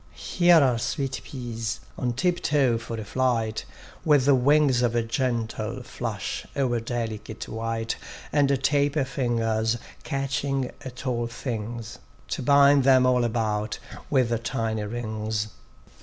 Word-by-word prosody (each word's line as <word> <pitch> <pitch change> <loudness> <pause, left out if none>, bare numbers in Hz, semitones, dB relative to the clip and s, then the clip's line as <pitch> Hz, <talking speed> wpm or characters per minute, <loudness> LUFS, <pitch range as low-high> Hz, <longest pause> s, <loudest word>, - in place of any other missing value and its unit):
Here 175 -1 +4
are 125 -3 +2
sweet 135 +1 -2
peas, 115 -4 -4 0.2
on 125 -2 -1
tip 175 +7 0
toe 135 -6 +2
for 115 0 -6
a 110 - -6
flight: 115 -2 0 0.4
With 145 -4 +4
wings 140 -1 +4
of 120 -2 +2
gentle 115 -1 -2
flush 115 -5 -4
o'er 125 -4 +1
delicate 115 -2 -4
white 115 0 -3 0.4
And 140 -2 +2
taper 145 0 +2
fingers 115 -3 0 0.3
catching 135 -1 -1
at 130 0 -8
all 120 -2 0
things, 115 -2 -5 0.3
To - - -2
bind 140 0 +6
them 130 -1 +6
all 125 -1 +3
about 110 -2 -1 0.3
with 120 -5 +2
tiny 110 -4 -1
rings. 110 -1 -3
120 Hz, 125 wpm, -26 LUFS, 115-135 Hz, 0.4 s, bind